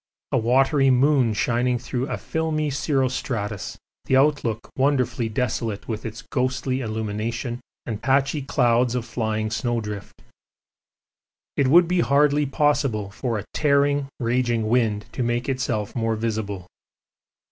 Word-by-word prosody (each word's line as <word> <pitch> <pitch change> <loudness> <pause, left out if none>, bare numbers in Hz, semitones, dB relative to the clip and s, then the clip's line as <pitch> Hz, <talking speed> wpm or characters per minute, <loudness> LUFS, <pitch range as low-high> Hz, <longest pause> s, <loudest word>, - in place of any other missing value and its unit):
A - - +3
watery 135 +4 +3
moon 130 -1 +4
shining 120 +3 +1
through 125 +2 -3
a - - -2
filmy 155 -2 -1
cirrostratus 130 - -2 0.3
the 130 - +3
outlook 135 -6 +1
wonderfully 130 -4 +1
desolate 110 -2 -2
with 110 0 -4
its 115 +3 -8
ghostly 130 0 -1
illumination 110 +2 -3 0.3
and 110 -3 -4
patchy 135 +2 +2
clouds 125 -3 +2
of 120 -2 -2
flying 110 -2 -2
snow 120 0 0
drift. 105 -2 -7 1.3
It 140 - +2
would 170 +5 +6
be 180 +1 +1
hardly 145 -1 +3
possible 140 -8 +1
for 115 +1 -2
a 105 - -5
tearing, 140 -1 +2
raging 120 -2 0
wind 110 -3 +1
to - - -4
make 120 +1 0
itself 120 -6 -2
more 115 -2 0
visible. 105 -4 -3
125 Hz, 130 wpm, -23 LUFS, 110-135 Hz, 1.3 s, would